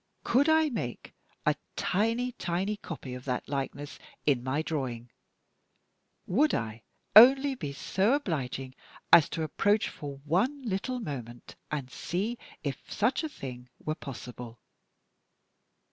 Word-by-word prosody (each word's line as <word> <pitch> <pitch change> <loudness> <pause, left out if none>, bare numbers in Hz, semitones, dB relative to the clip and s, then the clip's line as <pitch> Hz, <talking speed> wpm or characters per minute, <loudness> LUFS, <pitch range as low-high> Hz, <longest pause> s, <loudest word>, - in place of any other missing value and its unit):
Could 280 +6 +3
I 315 -1 +5
make 125 - -4 0.3
a - - +5 0.2
tiny, 230 +6 +1
tiny 190 -2 -1
copy 150 -9 -7
of 125 0 -7
that 125 -2 -2
likeness 140 +1 -4 0.3
in 135 -5 +3
my 135 +4 0
drawing! 125 -7 -3 1.1
Would 290 +11 +3
I 110 0 -3 0.3
only 270 +5 +9
be 155 - -5
so 195 - +1
obliging 135 - -2 0.4
as 160 - +9
to 160 - -2
approach 205 +7 +2
for 140 -2 -7
one 240 - +1
little 240 +4 -2
moment, 125 - -7
and 140 -4 -3
see 205 - -2 0.2
if 140 -4 -5
such 230 +9 +1
a 315 - -2
thing 125 - -8
were 155 - -3
possible? 125 -5 -8
160 Hz, 130 wpm, -29 LUFS, -, 1.1 s, only